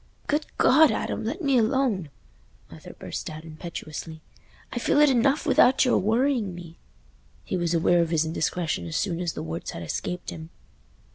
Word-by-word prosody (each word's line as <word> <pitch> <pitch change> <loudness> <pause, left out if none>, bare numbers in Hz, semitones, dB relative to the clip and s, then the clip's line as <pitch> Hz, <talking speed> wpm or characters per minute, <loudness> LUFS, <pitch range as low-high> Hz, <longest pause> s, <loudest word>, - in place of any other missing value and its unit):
"Good 295 +1 -1
God, 305 +4 +6
Adam, 220 - -2
let 290 - -3
me 275 -3 +3
alone!" 225 - +1 0.6
Arthur - - -11
burst - - -6
out 155 0 -8
impetuously; 160 -1 -7 0.5
"I 240 - -2
feel 280 - +2
it 295 -2 +6
enough 265 +4 +2
without 260 +1 +5
your 250 - +3
worrying 225 -2 +1
me." 170 -1 -11 0.6
He - - -3
was 175 -1 0
aware 170 +1 +3
of 165 - 0
his 160 -1 +1
indiscretion 160 - -2
as 80 - -5
soon 175 -4 -1
as 175 -3 -2
the - - -5
words 80 0 -5
had 85 - -6
escaped 180 - -4
him. 160 0 -9
180 Hz, 170 wpm, -25 LUFS, 160-255 Hz, 0.6 s, God